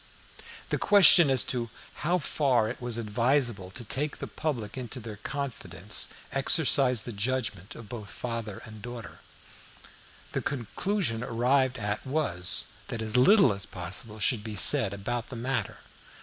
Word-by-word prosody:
The - - -1
question 185 -6 +6
as 130 -2 +3
to 120 -2 -3 0.3
how 175 +4 0
far 135 -8 0
it 120 - -7
was 120 -2 -3
advisable 115 -2 -1
to 120 +6 -9
take 140 +6 -3
the - - -6
public 120 -9 -5
into 125 0 -6
their 110 -3 -9
confidence 105 - -4 0.2
exercised 135 -4 +4
the 120 - -5
judgment 105 -3 -3
of 115 - -11
both 105 -2 -8
father 115 -4 -6
and 110 -1 -12
daughter. 120 -2 -9 1.1
The - - -3
conclusion 140 - -3
arrived 125 +2 +1
at 105 -1 -3
was 130 - +1 0.2
that 110 - -5
as 110 +1 -3
little 190 - +5
as 100 0 -2
possible 95 +5 -1
should 110 0 0
be 110 -1 -6
said 100 +1 +8
about 120 +4 -5
the 125 - -8
matter. 125 +3 -3
120 Hz, 150 wpm, -27 LUFS, 105-135 Hz, 1.1 s, said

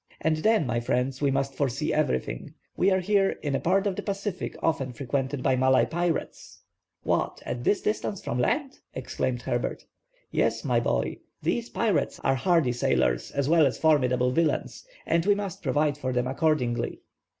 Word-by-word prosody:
And 160 0 +1
then, 215 0 +3
my 120 -1 0
friends, 125 +3 -1
we 140 - +3
must 135 0 0
foresee 140 +2 -1
everything. 65 - -1 0.2
We 190 - +3
are 190 -1 +2
here 195 +1 +2
in 145 -2 -1
a 135 - +1
part 195 +3 +2
of 200 -2 0
the - - -3
Pacific 200 -2 -4
often 135 -6 0
frequented 135 +2 -2
by 130 - +3
Malay 130 +1 +4
pirates—" 170 0 -3 0.4
"What, - - 0
at 120 0 -4
this 205 - +1
distance 210 -2 -1
from 120 - -2
land?" 275 - 0 0.2
exclaimed - - -2
Herbert. - - -2 0.5
"Yes, - - 0
my - - +2
boy, - - -1 0.3
these 235 0 -1
pirates 200 -11 0
are 135 - +3
hardy 160 -1 +2
sailors 60 - +1
as 140 -1 -1
well 160 -2 +5
as 130 - -3
formidable 125 -5 +3
villains, 165 +3 0 0.2
and 165 0 +2
we 205 - +5
must 195 -2 -5
provide 145 0 +1
for 130 -2 -2
them 125 0 0
accordingly." 130 -3 0
145 Hz, 170 wpm, -27 LUFS, 130-180 Hz, 0.5 s, well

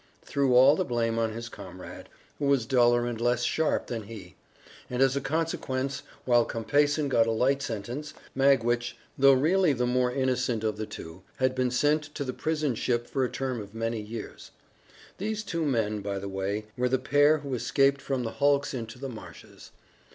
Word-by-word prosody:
threw 135 -3 +1
all 135 +4 +7
the 185 - 0
blame 115 -5 -1
on 115 -1 0
his 115 +2 -6
comrade, 95 -5 -10 0.3
who 145 - -1
was 140 -4 +2
duller 120 -1 +3
and 120 -2 -4
less 120 0 +1
sharp 160 +5 +1
than 115 -2 -4
he, 100 -5 -10 0.5
and 125 - -3
as 135 0 +4
a 140 - 0
consequence, 140 -3 -2 0.2
while 120 -2 +4
Compeyson 145 +7 +1
got 115 -4 +3
a - - +1
light 135 +5 +2
sentence, 130 +6 -5 0.2
Magwitch, 120 -3 +2 0.2
though 135 0 +6
really 160 +5 +3
the 125 -1 0
more 125 0 +1
innocent 125 -3 0
of 110 -1 -1
the 110 0 -4
two, 80 +3 -9
had 130 0 +1
been 130 -1 0
sent 145 +5 +2
to 145 - -2
the 130 -2 -4
prison 155 -3 -1
ship 120 +1 -1
for 135 +1 -1
a 125 - 0
term 130 -4 -3
of 100 +1 -11
many 115 0 -2
years. 110 +1 -8 0.7
These 215 +2 -2
two 170 -5 -2
men, 110 -5 0
by 100 0 -3
the 100 +1 -5
way, 100 +2 -3
were 125 0 0
the 130 - +2
pair 145 +4 +4
who 140 -3 -6
escaped 135 +3 +2
from 130 -2 -2
the 115 - -3
hulks 140 +1 +1
into 115 -2 -6
the 135 +2 -5
marshes. 115 -4 -11
125 Hz, 190 wpm, -28 LUFS, 115-140 Hz, 0.7 s, all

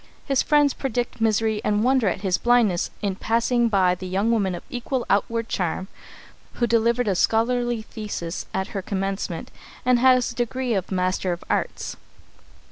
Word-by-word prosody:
His 275 -2 +2
friends 295 -2 +3
predict 245 -3 -3
misery, 220 -1 +1
and 210 0 +1
wonder 255 -3 +3
at 185 - -1
his 190 -3 +1
blindness 235 -7 +3
in 195 -2 -1
passing 235 +2 +1
by 190 -4 +3
the 185 +1 -6
young 195 +5 +1
woman 195 -5 +1
of 175 - -8
equal 245 0 -3
outward 230 +3 +1
charm 185 0 -2 0.6
who 240 - 0
delivered 235 +1 +2
a 200 - +3
scholarly 235 +3 +1
thesis 205 -6 -5
at 190 - -2
her 195 - -4
commencement 195 -3 -3 0.3
and 250 -1 +4
has 255 -1 +4
the - - -8
degree 245 0 -1
of 190 -2 -2
Master 185 0 0
of 175 - -8
Arts. - - -2
220 Hz, 165 wpm, -24 LUFS, 190-240 Hz, 0.6 s, and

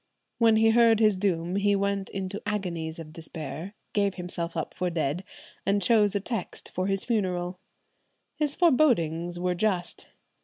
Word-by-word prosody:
"When 225 -2 +5
he 225 +1 +5
heard 230 -1 +5
his 215 -2 +4
doom 185 -2 0
he 200 0 +3
went 200 0 -1
into 195 +1 -4
agonies 175 -6 -3
of 155 -2 -9
despair, 165 +3 -6 0.2
gave 200 -2 +1
himself 175 -2 -4
up 160 - -3
for 180 - -1
dead, 165 +1 -1 0.4
and 200 +1 +2
chose 210 +1 +3
a - - +2
text 210 -1 -5
for 185 +1 -1
his 195 -1 -1
funeral. 180 -5 -1 0.8
His 295 -2 -1
forebodings 175 - +2
were 180 0 0
just. 180 -1 -1
195 Hz, 155 wpm, -27 LUFS, 175-210 Hz, 0.8 s, When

